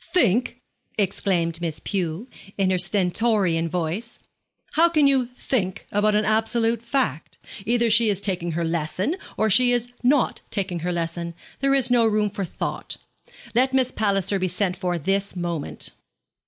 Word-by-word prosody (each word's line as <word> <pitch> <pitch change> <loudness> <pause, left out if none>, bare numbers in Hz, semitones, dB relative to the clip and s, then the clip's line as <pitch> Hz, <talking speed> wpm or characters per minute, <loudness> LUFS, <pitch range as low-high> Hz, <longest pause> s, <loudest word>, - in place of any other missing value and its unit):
'Think?' 245 - +2 0.4
exclaimed 175 -4 0
Miss 165 -3 -2
Pew, 185 +2 -3 0.3
in 190 -2 +2
her 185 - +2
stentorian 185 -2 +1
voice. 180 +7 -3 0.6
'How 335 +2 +5
can 305 -4 +3
you 265 -3 +3
think 235 -6 -2
about 210 +1 +2
an 210 0 +2
absolute 225 +1 +1
fact? 235 - -2 0.3
Either 235 -1 +2
she 230 0 +5
is 200 -2 0
taking 180 -4 -2
her 170 +1 -1
lesson, 170 - -1 0.2
or 220 - +2
she 245 +4 +4
is 245 0 0
not 260 +1 +2
taking 190 -4 -2
her 175 +2 -2
lesson. 170 0 -3 0.2
There 275 0 +3
is 255 -2 +2
no 235 -2 +5
room 210 -1 +1
for 200 0 -3
thought. - - -5 0.6
Let 260 +3 +2
Miss 260 -1 +2
Palliser 200 -2 +1
be 185 - 0
sent 180 +1 -1
for 180 -2 -2
this 195 +4 -1
moment.' 170 -4 -4
200 Hz, 155 wpm, -24 LUFS, 175-235 Hz, 0.6 s, How